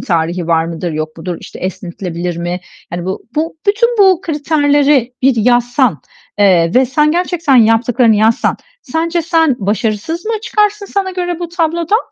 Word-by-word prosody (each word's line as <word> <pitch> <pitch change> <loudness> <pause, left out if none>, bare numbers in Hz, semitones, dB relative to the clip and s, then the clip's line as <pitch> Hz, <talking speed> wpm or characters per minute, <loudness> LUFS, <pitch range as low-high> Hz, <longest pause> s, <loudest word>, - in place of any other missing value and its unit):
tarihi 170 0 -1
var 165 -1 +2
mıdır, 170 +1 -4
yok 155 0 -4
mudur, 175 +1 -4
işte, - - -11
esnetilebilir 175 -1 -5
mi? 175 +1 -3 0.3
Yani 175 0 -4
bu 190 +1 -4
bu 320 +2 -2
bütün 470 +4 +2
bu 380 -3 +5
kriterleri 290 -5 +1
bir 265 -1 +3
yazsan, 240 - +2 0.4
eee, 180 -5 +4
ve 255 +1 +4
sen 300 +4 +2
gerçekten 340 -5 +1
yaptıklarını 225 0 +3
yazsan 220 +2 +2 0.3
sence 335 +1 -1
sen 325 -4 +2
başarısız 215 - -2
mı 455 - -1
çıkarsın 420 -1 0
sana 390 -1 -2
göre 355 -2 -3
bu 345 -1 -5
tablodan? 340 +3 0
255 Hz, 155 wpm, -14 LUFS, -, 0.4 s, bu